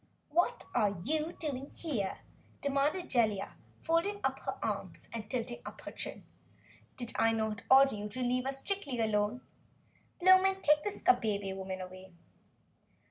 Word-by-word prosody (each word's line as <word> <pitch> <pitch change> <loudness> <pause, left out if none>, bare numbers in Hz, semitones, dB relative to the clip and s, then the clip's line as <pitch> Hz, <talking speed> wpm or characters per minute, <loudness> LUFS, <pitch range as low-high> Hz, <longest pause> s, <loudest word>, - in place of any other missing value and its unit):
"Just - - -35
what 355 +9 +2
are 205 -1 +2
you 310 - -1
doing 280 -3 -4
here?" 240 - -3 0.4
demanded 285 +5 +1
Jellia, 215 -6 +1 0.3
folding 335 +5 +1
her - - -2
arms - - -4
and 220 -2 -5
tilting 240 -1 -3
up - - -9
her - - -7
chin. - - -6 0.7
"Did 240 -2 -4
I 225 0 +4
not 220 -1 -1
order 270 +1 +7
you 210 0 -4
to 255 +5 -5
leave 250 +1 +1
us 270 0 -3
strictly 325 -12 -3
alone? 215 +2 +1 0.8
Blowmen, 375 +1 +5
take 300 0 +5
this 415 - -4
Kabebe 205 - +2
woman 190 -1 -5
away!" 185 0 -10
255 Hz, 145 wpm, -32 LUFS, 210-315 Hz, 0.8 s, order